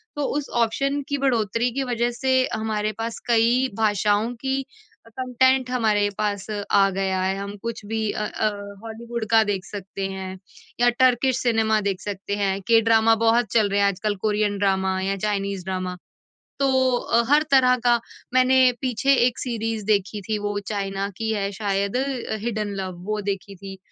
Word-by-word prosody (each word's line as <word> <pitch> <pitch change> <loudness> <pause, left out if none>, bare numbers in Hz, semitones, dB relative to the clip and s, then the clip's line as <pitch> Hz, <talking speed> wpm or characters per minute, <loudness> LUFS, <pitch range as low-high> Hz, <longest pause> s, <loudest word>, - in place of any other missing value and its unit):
तो 290 - -2
उस 290 - -3 0.2
ऑप्शन 275 +5 -1
की 285 - 0
बढ़ोतरी 235 -3 +1
की 270 +2 -1
वज़ह 240 -2 0
से 260 +2 -1 0.2
हमारे 215 -1 -1
पास 225 0 -4
कई 240 +2 +3
भाषाओं 210 +1 +1
की 270 0 0 0.5
कंटेंट 255 +2 +1
हमारे 215 -4 +2
पास 205 -2 -1 0.3
आ 195 -1 +5
गया 190 -1 -1
है। 190 +1 0
हम 200 +1 -5
कुछ 230 -2 -5
भी 220 0 -1
अ 215 - -3
अ, 215 - 0 0.3
हॉलीवुड 230 +1 -5
का 225 -1 +6
देख 200 -3 -2
सकते 195 -1 -5
हैं, 190 0 -6 0.4
या 245 0 +5
टर्किश 255 0 +3
सिनेमा 220 -2 +2
देख 195 -2 -2
सकते 200 0 -4
हैं। 195 -1 -1
के 230 -1 +6
ड्रामा 225 0 +4
बहुत 230 +1 +4
चल 215 -3 +3
रहे 200 +1 +1
हैं 200 - +4
आजकल, 205 +2 -1
कोरियन 205 0 0
ड्रामा 190 -1 +1
या 195 +1 -1
चाइनीज़ 200 -2 -2
ड्रामा। 185 -1 -3 0.6
तो 260 -2 +2
अ, 235 - +1
हर 295 +1 +6
तरह 255 -2 +5
का 240 -1 +4 0.3
मैंने 255 0 +5
पीछे 265 +1 +2
एक 250 - -1
सीरीज़ 225 -3 -3
देखी 205 0 0
थी, 215 -1 0
वो 205 0 -2
चाइना 195 -1 -2
की 225 +2 -2
है 200 -2 -1
शायद 200 +1 -1
अ, 260 -4 -2
हिडेन 215 -3 -2
लव। 185 -2 -5
वो 215 0 -1
देखी 195 0 -6
थी। 195 +1 -9
220 Hz, 175 wpm, -23 LUFS, 200-240 Hz, 0.6 s, का